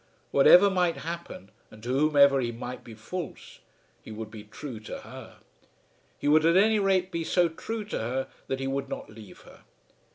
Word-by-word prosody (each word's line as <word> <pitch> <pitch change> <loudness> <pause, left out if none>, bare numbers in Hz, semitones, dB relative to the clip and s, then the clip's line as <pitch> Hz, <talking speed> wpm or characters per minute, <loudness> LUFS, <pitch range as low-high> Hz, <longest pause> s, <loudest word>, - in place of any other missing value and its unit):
Whatever 180 +8 +7
might 180 -3 +1
happen, 170 - -7 0.2
and 110 - -15
to 120 - -6
whomever 140 0 +4
he 120 -1 -2
might 125 +2 -7
be 115 - -11
false, 165 +11 -8 0.4
he - - -13
would 110 0 -7
be 110 -2 -9
true 115 +2 -8
to 110 - -8
her. - - -11 0.8
He - - -4
would 155 +1 +5
at 165 +2 +4
any 215 +2 +4
rate 190 -2 +1
be 170 -1 -2
so 175 +1 +2
true 215 +6 -6
to 205 - -4
her 130 +4 -2 0.2
that 135 - -2
he 135 - -3
would 135 +1 -3
not - - -7
leave 110 -2 -13
her. - - -17
140 Hz, 190 wpm, -27 LUFS, 120-180 Hz, 0.8 s, Whatever